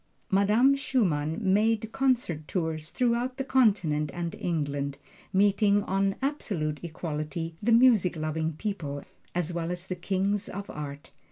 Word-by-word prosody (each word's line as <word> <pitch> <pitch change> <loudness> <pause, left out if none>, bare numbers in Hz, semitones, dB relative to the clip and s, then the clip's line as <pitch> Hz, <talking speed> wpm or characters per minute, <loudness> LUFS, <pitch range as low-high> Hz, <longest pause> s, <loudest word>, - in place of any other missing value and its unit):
Madame 210 +7 +5
Schumann 165 - 0
made 215 +3 +2
concert 235 - 0
tours 160 -3 -2
throughout 245 +1 0
the 270 - -1
Continent 195 - +2
and 170 -1 -3
England, 145 -4 -2 0.3
meeting 205 +1 +3
on 195 0 0
absolute 180 - -1
equality 165 0 -4
the 225 +3 +1
music 230 -7 +5
loving 160 +1 -2
people, 150 -6 -4 0.3
as 175 -1 -1
well 170 -1 -2
as 180 0 -2
the 185 - -3
Kings 195 +3 -1
of 200 +1 -6
Art. 145 -1 -7
185 Hz, 135 wpm, -28 LUFS, 155-215 Hz, 0.3 s, Madame